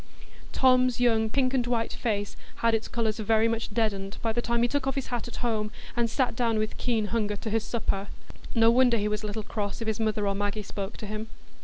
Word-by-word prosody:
Tom's 255 -1 +4
young 225 -3 +3
pink 255 +2 +1
and 250 -2 +1
white 230 -2 0
face 205 -3 -2 0.2
had 230 0 +2
its 225 0 0
colours 225 -2 -1
very 220 +1 +3
much 230 0 -1
deadened 200 -3 -1
by 225 -1 +1
the 240 - 0
time 235 0 +1
he - - +4
took 275 +1 -1
off 270 - 0
his 275 - -3
hat 240 -1 -2
at 240 - -8
home, 215 -2 0 0.3
and 235 -1 +1
sat 255 -1 0
down 230 -2 +1
with 215 0 -1
keen 230 -4 +1
hunger 210 -3 +1
to 215 +2 -5
his 225 0 +1
supper. 205 -3 -2 0.5
No 225 0 +6
wonder 245 -1 +5
he 210 -1 0
was 210 0 -1
a 215 - -3
little 210 +1 -4
cross 205 -1 -3
if 225 - -4
his 220 -1 0
mother 215 -2 0
or 200 - +1
Maggie 205 +1 -2
spoke 200 +1 -5
to - - -7
him. 215 +1 -4
225 Hz, 235 wpm, -27 LUFS, 210-240 Hz, 0.5 s, No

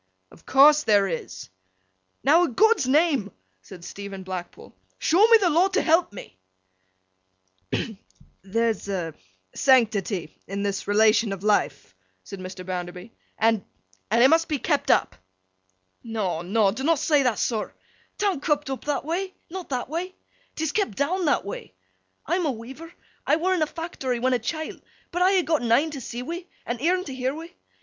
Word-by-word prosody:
'Of - - -19
course 295 +3 +6
there 205 -7 +3
is.' 125 - -6 0.7
'Now, 310 +6 +5
a' - - -1
God's 420 - +3
name,' 280 - +2 0.3
said 170 - -12
Stephen 200 -1 -8
Blackpool, 185 -2 -8 0.2
'show 380 +7 +4
me 460 0 +8
the 375 -5 +1
law 340 +5 +4
to 390 +2 0
help 330 - +3
me!' 135 - -11 1.3
'Hem! 220 -4 -3 0.4
There's 220 +1 -1
a 175 -5 -3 0.4
sanctity 210 - +2
in 200 +1 -3
this 200 -1 -3
relation 215 +1 +4
of 195 -1 -6
life,' 140 - 0 0.3
said 195 - -9
Mr. 185 0 -8
Bounderby, 180 +2 -6 0.3
'and—and—it 215 - +1
must 325 +3 +3
be 300 - -1
kept - - -1
up.' - - +3 0.9
'No 210 -8 -2
no, 195 +3 +2
dunnot 275 +9 +1
say 295 0 +3
that, 250 -5 +1
sir. 220 -3 -1 0.5
'Tan't 390 -8 0
kep' 295 -3 0
up 265 - -5
that 290 -1 -1
way. 370 +4 -3 0.2
Not 370 0 -7
that 255 -3 -2
way. 345 +6 -4 0.4
'Tis 315 -1 -1
kep' 400 - -1
down 345 - 0
that 290 - +1
way. 200 - -7 0.5
I'm 345 +1 0
a - - +1
weaver, 265 +8 -9 0.4
I - - +5
were 360 +4 +1
in 360 - 0
a 310 - +2
fact'ry 300 -7 -4
when 255 +2 +1
a 250 - +2
chilt, 315 +8 -5 0.3
but 355 - -2
I 375 +1 +4
ha' 355 - -1
gotten 290 -8 0
een 295 +7 +3
to 280 -3 -6
see 240 +1 -6
wi' 340 +6 -6 0.2
and 240 0 -4
eern 365 +4 +2
to 275 - -7
year 260 +2 -2
wi'. 330 +2 -9
255 Hz, 170 wpm, -25 LUFS, 200-325 Hz, 1.3 s, me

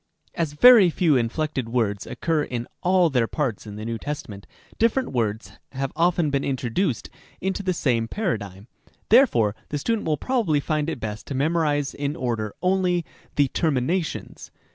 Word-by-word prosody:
As 165 -4 -2
very 220 +3 +8
few 165 -2 +2
inflected 130 +1 -1
words 110 -4 -1
occur 160 -2 -1
in 120 -4 -4
all 180 -2 +3
their 120 -4 +2
parts 125 -8 -3
in 105 - -8
the 105 +1 -6
New 115 -1 -3
Testament, 145 -10 -6 0.3
different 235 +3 +2
words 110 -3 -2 0.2
have 135 0 -3
often 170 -2 +2
been 140 0 0
introduced 130 - -1 0.3
into 190 +2 -2
the 185 -2 0
same 120 -9 0
paradigm; 105 - -3 0.4
therefore 120 - +4
the 150 - -2
student 220 +7 -1
will 155 -1 +1
probably 215 - +1
find 155 +1 -1
it 160 - -4
best 110 -1 -6
to 140 - -4
memorize 145 -1 +1
in 145 +1 -3
order 115 -7 -3
only 180 -2 +1 0.3
the 140 -2 +3
terminations. 160 +4 -2
145 Hz, 160 wpm, -24 LUFS, 115-175 Hz, 0.4 s, very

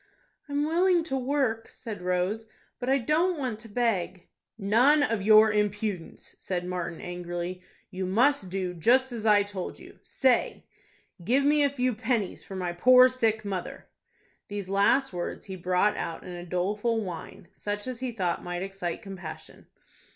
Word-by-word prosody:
"I'm 285 +1 0
willing 345 +2 +3
to 320 -5 -3
work," 255 -4 -1
said 220 -6 -8
Rose, 180 +5 -1 0.3
"but 250 0 -3
I 270 - +4
don't 315 +8 +1
want 250 -6 -3
to 225 0 -10
beg." 200 -6 -1 0.3
"None 240 +9 +4
of 225 -7 0
your 215 +1 +7
impudence!" 210 -3 -2
said 180 -2 -3
Martin, 175 -2 -4
angrily. 175 0 -5 0.3
"You 185 -1 -3
must 230 +1 +2
do 185 -1 -2
just 250 +10 +3
as 225 -2 -3
I 205 -1 +6
told 200 -3 -6
you. - - -15
Say, 260 -3 +1 0.6
'Give 255 +9 +2
me 295 +1 +4
a 285 - +4
few 255 -2 0
pennies 225 -3 -2
for 195 - -9
my 180 -2 -2
poor 255 +7 +7
sick 225 -4 0
mother.'" 190 -3 -5 0.6
These 200 -2 -5
last 200 +6 +3
words 175 -1 -5
he 190 - -6
brought 185 +3 +1
out 165 -1 -4
in 180 - -8
a 175 0 -8
doleful 210 +6 0
whine, 175 -1 -8
such 205 0 -4
as 255 -2 -5
he 255 -1 -3
thought 185 -6 -2
might 175 0 -4
excite 195 -1 -5
compassion. 190 -4 -9
210 Hz, 165 wpm, -27 LUFS, 180-250 Hz, 0.6 s, your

